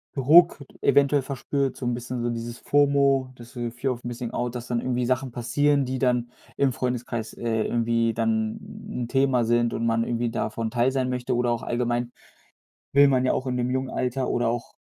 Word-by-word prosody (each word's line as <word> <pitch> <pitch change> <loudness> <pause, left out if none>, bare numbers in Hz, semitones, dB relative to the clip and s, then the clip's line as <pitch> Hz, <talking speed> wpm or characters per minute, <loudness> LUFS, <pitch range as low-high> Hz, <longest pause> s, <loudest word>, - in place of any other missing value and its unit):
Druck 150 +2 +5 0.2
eventuell 140 0 +4
verspürt, 135 0 -2
so 125 - -6
'n 120 - 0
bisschen 120 0 -4
so 120 - 0
dieses 115 0 -5
FOMO, 140 -2 +2
das 120 -1 -12
ist - - -18
so 120 -1 -3
Fear 130 +2 -2
of 120 - -12
Missing 120 0 -5
Out, 120 0 -3
dass 120 -1 -5
dann 120 -1 -1
irgendwie 125 -1 -1
Sachen 130 +1 -1
passieren, 140 +4 +1
die 130 0 -3
dann 125 -2 +1 0.2
im 135 -3 +2
Freundeskreis 120 -3 -3
äh, 110 -2 -1
irgendwie 115 -1 +1
dann 110 -1 0 0.3
'n 125 - -3
'n - - -4
Thema 135 -2 +2
sind 120 0 +2
und 115 - -2
man 115 0 +2
irgendwie 120 -1 -1
davon 110 +1 -3
Teil 125 +1 +2
sein 130 -1 -1
möchte 125 -1 -2
oder 120 0 +1
auch 120 - -1
allgemein, 120 0 -1 0.8
will 140 +1 +7
man 130 -1 +2
ja - - +2
auch 130 - -2
im 125 -1 -1
jungen 130 0 -1
Alter 130 +1 -2
oder 120 -1 +1
auch 120 0 -4
125 Hz, 205 wpm, -25 LUFS, 120-130 Hz, 0.8 s, will